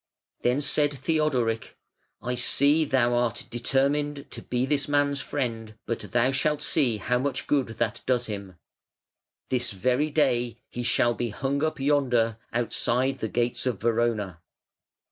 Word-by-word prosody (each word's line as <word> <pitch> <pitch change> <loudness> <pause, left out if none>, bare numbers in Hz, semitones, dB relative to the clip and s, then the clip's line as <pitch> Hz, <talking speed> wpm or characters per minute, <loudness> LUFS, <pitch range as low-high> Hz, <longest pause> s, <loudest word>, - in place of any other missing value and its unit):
Then 125 +4 +1
said 145 0 +2
Theodoric: 130 -6 0 0.5
"I 125 - -1
see 140 +5 +3
thou 125 -4 +2
art 120 -1 0
determined 140 +4 0
to - - -6
be 125 +1 -1
this 140 -1 0
man's 145 -1 +1
friend; 115 -5 -4
but 115 - -2
thou 120 +2 +3
shalt 150 +2 0
see 125 -8 +2
how 125 +5 0
much 140 +2 -2
good 140 -3 +1
that 115 -3 -1
does 125 -1 +2
him. 100 -4 -6 0.9
This 125 -1 0
very 125 +9 +1
day 125 -6 +1
he 120 - -5
shall 120 0 +2
be 120 0 -3
hung 135 +7 -2
up 155 -1 -1
yonder 125 -6 +2
outside 125 +2 0
the 110 - -3
gates 120 +3 -1
of 120 -7 -1
Verona". 110 -6 0
125 Hz, 145 wpm, -26 LUFS, 120-140 Hz, 0.9 s, see